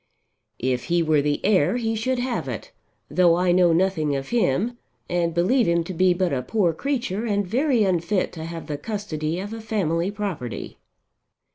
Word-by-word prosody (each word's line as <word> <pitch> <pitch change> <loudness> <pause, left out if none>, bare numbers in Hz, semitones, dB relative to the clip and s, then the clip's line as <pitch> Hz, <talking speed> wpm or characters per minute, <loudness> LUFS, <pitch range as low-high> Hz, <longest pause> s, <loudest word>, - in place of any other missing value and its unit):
"If 125 0 -1
he 170 -1 +2
were 155 -2 +3
the 145 0 0
heir 195 0 +3
he 225 -2 -1
should 255 +4 -1
have 245 0 -2
it, - - -6 0.4
though 175 -2 +4
I 180 0 +2
know 175 -1 +5
nothing 165 -4 +1
of 135 0 -4
him 235 - +1 0.3
and 175 -1 0
believe 190 +10 +2
him 170 0 +2
to 185 - -6
be 185 +2 +3
but 180 -3 0
a 130 - 0
poor 175 - +1
creature 235 - -2
and 205 -2 0
very 250 - +2
unfit 185 0 0
to 160 -2 -6
have 165 0 -6
the 150 -2 -4
custody 170 -5 -3
of 205 +3 -5
a 225 - -6
family 185 -5 0
property." 195 - -5
180 Hz, 180 wpm, -24 LUFS, 165-215 Hz, 0.4 s, know